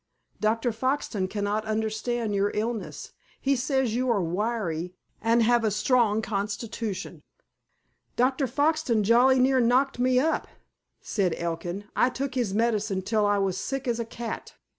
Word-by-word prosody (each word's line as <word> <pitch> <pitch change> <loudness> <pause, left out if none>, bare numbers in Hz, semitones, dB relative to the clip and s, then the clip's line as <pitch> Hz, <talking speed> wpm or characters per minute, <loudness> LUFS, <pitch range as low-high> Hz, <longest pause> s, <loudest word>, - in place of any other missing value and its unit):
Dr. 225 +3 +1
Foxton 225 -4 -1
cannot 205 +1 -1
understand 220 +1 -1
your 200 0 +2
illness. 220 +1 -3 0.3
He 275 0 +1
says 260 -2 0
you 255 +2 0
are 230 -4 +3
wiry, 180 -2 -2 0.3
and 230 +1 +3
have 240 +1 +3
a 220 - +3
strong 220 0 +2
constitution." 210 0 -4 0.9
"Dr. 260 +2 +2
Foxton 285 -4 +1
jolly 245 +5 +5
near 260 +1 +4
knocked 250 +2 +2
me 255 0 +3
up," 320 +4 0 0.5
said 185 -6 0
Elkin. 170 +3 -3
"I 250 - +4
took 265 +1 -4
his 245 -6 0
medicine 210 -3 0
till 210 +1 +1
I 205 0 +2
was 195 -2 0
sick 270 0 -3
as 240 -1 0
a - - 0
cat." 230 0 -6
225 Hz, 145 wpm, -26 LUFS, 205-250 Hz, 0.9 s, jolly